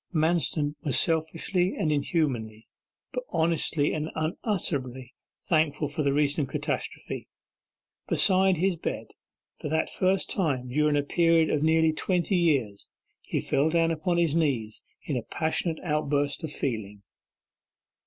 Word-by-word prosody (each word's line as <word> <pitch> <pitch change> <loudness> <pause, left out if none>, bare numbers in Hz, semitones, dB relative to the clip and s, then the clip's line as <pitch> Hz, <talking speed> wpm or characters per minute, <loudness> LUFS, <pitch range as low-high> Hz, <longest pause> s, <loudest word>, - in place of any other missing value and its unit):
Manston 160 -3 +1
was 140 -6 +2
selfishly 165 +3 +1
and 155 - 0
inhumanly, 130 -8 -1 0.5
but - - -2
honestly 160 -2 +1
and 155 0 -2
unutterably, 145 - -3 0.3
thankful 155 -4 +1
for 150 +2 -3
the 140 -2 +2
recent 145 0 +1
catastrophe. - - -4 0.8
Beside 190 -1 +3
his 185 +2 +1
bed, - - -4 0.5
for 150 - -4
that 160 +1 0
first 185 0 +1
time 135 -9 -1
during 150 +3 +2
a 145 - +1
period 165 +1 +3
of 150 - +1
nearly 160 0 +3
twenty 180 +3 0
years, 140 - +1 0.3
he - - -2
fell 145 +3 +1
down 165 0 +2
upon 170 +2 -1
his 170 -4 +2
knees 130 -10 0 0.2
in 145 - -3
a - - -1
passionate 160 +5 -1
outburst 145 -2 0
of 160 - -4
feeling. 105 -8 -4
155 Hz, 135 wpm, -27 LUFS, 140-170 Hz, 0.8 s, Beside